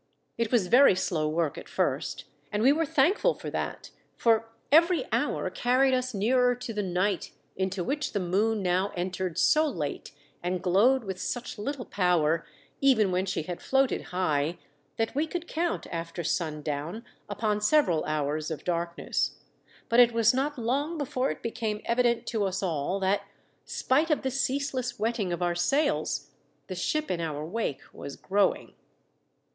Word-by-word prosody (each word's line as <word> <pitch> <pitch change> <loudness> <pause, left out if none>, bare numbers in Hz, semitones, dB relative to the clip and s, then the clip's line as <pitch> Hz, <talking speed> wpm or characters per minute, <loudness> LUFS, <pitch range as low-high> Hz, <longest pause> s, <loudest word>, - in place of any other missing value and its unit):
It 230 -2 -1
was 235 -7 +3
very 245 +1 +6
slow 160 -4 0
work 160 -2 -1
at - - -12
first, - - -1 0.3
and 210 +1 0
we 265 - +7
were 325 +1 0
thankful 365 - +3
for - - -7
that; - - -4 0.3
for 225 -1 +2 0.2
every 335 +3 +5
hour - - 0
carried 260 +2 +2
us 255 0 0
nearer 245 +4 +2
to 245 -1 -6
the 210 - -1
night 185 0 -1 0.2
into 190 -1 -1
which 290 - -2
the 205 - -1
moon 200 +4 +1
now 185 +2 +1
entered 180 -1 -3
so 310 +9 +4
late 155 - -4 0.3
and 180 +1 -1
glowed 210 +9 +3
with 190 -3 -5
such 245 -2 -4
little 265 +3 -4
power, 170 -4 +1 0.3
even 230 -8 +4
when 185 +2 0
she 185 - -1
had 175 +2 -6
floated 270 -1 +1
high, 165 -3 0 0.4
that 225 0 0
we 300 +3 0
could 345 +1 -5
count, 335 +2 -1
after 165 +1 -4
sundown, 155 +5 -3 0.2
upon 210 0 -1
several 210 - +3
hours 155 0 -1
of 155 -3 -5
darkness; 170 -1 -1 0.5
but 235 - +3
it 240 -1 +7
was 230 0 +4
not 280 +3 -1
long 280 +8 -1
before 265 -2 -1
it - - -5
became 220 -2 -2
evident 235 0 +2
to 215 -3 -1
us 190 +1 -2
all 170 +2 -1
that, 195 +1 +1 0.4
spite 295 +6 +1
of 305 - +1
the 265 - 0
ceaseless 265 -2 -1
wetting 220 -4 -1
of 175 +1 -2
our 175 0 +1
sails, 175 - 0 0.3
the 185 - -6
ship 305 +10 -1
in 175 -2 -1
our 155 -2 -3
wake 175 -5 -3
was 140 - -8
growing. 200 0 0
210 Hz, 165 wpm, -28 LUFS, 175-255 Hz, 0.5 s, we